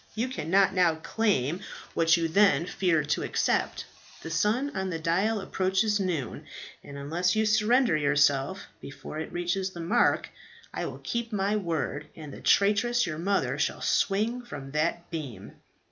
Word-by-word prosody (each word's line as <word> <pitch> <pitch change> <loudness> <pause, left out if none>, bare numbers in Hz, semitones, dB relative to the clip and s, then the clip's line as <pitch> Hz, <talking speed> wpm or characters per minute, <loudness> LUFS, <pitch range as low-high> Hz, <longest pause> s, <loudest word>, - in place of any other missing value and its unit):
You 235 +4 -1
cannot 195 - +2
now 180 -3 +3
claim 165 - 0 0.3
what 165 +1 +4
you 165 -1 0
then 170 -3 +4
feared 170 -6 0
to - - +1
accept. - - 0 0.4
The 165 - -6
sun 215 - 0
on 190 -1 -2
the 165 - -2
dial 185 +7 +1
approaches 195 +2 0
noon, 170 - -3 0.4
and 140 - -9
unless 170 +7 0
you 220 0 +2
surrender 215 0 +3
yourself 145 +3 +2 0.2
before 145 +2 -8
it 160 - -5
reaches 175 +2 -1
the 175 - -10
mark, 205 +9 +2 0.4
I - - -3
will - - -8
keep 235 -1 -3
my 205 0 0
word, 165 -6 -2
and 150 -3 -9
the - - -10
traitress, 215 +4 +3
your 155 -1 -4
mother, 195 +3 0
shall - - -1
swing 220 +5 +1
from 145 - -9
that 165 +4 -1
beam." 150 -8 -7
180 Hz, 160 wpm, -27 LUFS, 160-210 Hz, 0.4 s, what